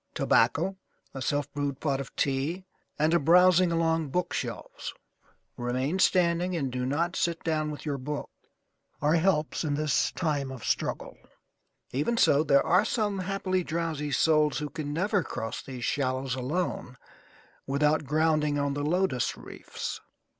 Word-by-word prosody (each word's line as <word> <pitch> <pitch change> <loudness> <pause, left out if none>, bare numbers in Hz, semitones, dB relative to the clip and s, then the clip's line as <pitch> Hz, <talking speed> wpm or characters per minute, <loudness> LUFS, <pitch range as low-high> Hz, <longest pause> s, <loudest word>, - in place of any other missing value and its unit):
Tobacco, 165 +12 +2 0.4
a 135 - -6
self 145 +1 -1
brewed 145 -2 -2
pot 140 -3 0
of 135 - -10
tea, 145 +7 -1 0.3
and 155 +2 +2
a 170 - +5
browsing 180 +3 +5
along 165 -2 +1
bookshelves 180 +6 -4 0.6
(remain 130 +8 -1
standing 180 -1 +3
and 140 -6 -1
do 125 0 -2
not 170 +6 0
sit 170 -1 -1
down 155 -2 0
with 150 +1 -7
your 145 -2 -2
book) 145 +3 -5 0.7
are 150 +1 +2
helps 165 -2 +1
in 145 -2 0
this 150 -2 +1
time 145 -6 -1
of 130 -4 -8
struggle. - - -2 0.8
Even 150 - 0
so, 145 -8 +4
there 140 -3 +4
are 180 +4 +4
some 210 -3 -1
happily 185 -1 -1
drowsy 160 -3 -2
souls 155 -1 +3
who 150 0 -4
can 155 -3 -4
never 185 +5 +1
cross 115 -6 -5
these 125 -3 -6
shallows 130 -2 -1
alone 130 -1 -3 0.7
without 150 +3 +2
grounding 155 0 +2
on 140 -1 0
the 145 - -3
Lotus 165 -5 0
Reefs. - - -7
150 Hz, 145 wpm, -28 LUFS, 140-170 Hz, 0.8 s, a